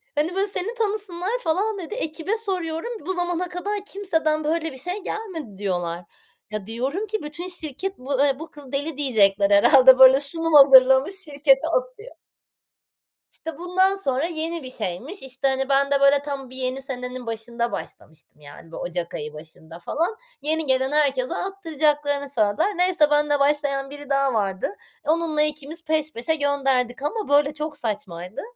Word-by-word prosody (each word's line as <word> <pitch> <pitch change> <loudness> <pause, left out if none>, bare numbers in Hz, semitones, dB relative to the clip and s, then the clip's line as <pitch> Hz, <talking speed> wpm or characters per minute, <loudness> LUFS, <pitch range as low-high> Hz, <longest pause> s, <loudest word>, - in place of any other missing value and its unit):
Hani, 310 +5 0
böyle, 390 +1 +1
seni 400 +3 -1
tanısınlar, 410 -5 -2
falan 400 +7 0
dedi. 355 +2 -7
Ekibe 350 0 -3
soruyorum, 370 -1 -3
"Bu 375 - -1
zamana 355 0 -2
kadar 405 +4 -3
kimseden 320 -7 -1
böyle 325 +1 -1
bir 265 - -10
şey 360 +9 -4
gelmedi" 330 - -6
diyorlar. 175 -3 -3 0.5
Ya 215 -2 -4
diyorum 260 - -3
ki, 435 -2 -3
bütün 300 +4 -5
şirket 355 +2 -3
bu, 265 +1 -3
eee, 275 -1 +1
bu 320 - -8
kız 285 -3 -11
deli 285 +1 -3
diyecekler 205 -8 +3
herhâlde. 260 +5 +7
Böyle 265 +1 +9
sunum 325 +3 +1
hazırlamış 265 +2 +7
şirkete 285 -3 +2
atıyor. - - -3 1.2
İşte, 325 -3 -8
bundan 375 +3 +2
sonra 275 -7 0
yeni 330 -1 -3
bir 255 - -7
şeymiş. 245 - -4
İşte, 265 +1 -2
hani, 270 0 0
ben 275 +1 +2
de 280 -1 +2
böyle 280 +1 +5
tam 280 -2 -6
bir 260 - -11
yeni 260 +1 -3
senenin 250 -1 -6
başında 235 +1 -3
başlamıştım. 155 -1 -10
Yani, 145 +3 -14
bu - - -8
Ocak 175 -1 -4
ayı 150 0 -5
başında 160 +2 -11
falan. 335 - -2 0.2
Yeni 315 +2 -1
gelen 265 0 +1
herkese 275 -4 +1
attıracaklarını 295 -6 -1
söylediler. 235 - +1
Neyse 355 -4 +3
benle 295 -1 +2
başlayan 280 -1 +1
biri 290 0 -10
daha 275 -1 +2
vardı. 195 -4 -1 0.3
Onunla 315 0 +1
2'miz 305 +2 -3
peş 310 -1 -1
peşe 245 +8 -1
gönderdik 270 -4 0
ama 420 +8 -2
böyle 285 0 +3
çok 300 0 -5
saçmaydı. 195 -4 -5
290 Hz, 160 wpm, -23 LUFS, 255-335 Hz, 1.2 s, Böyle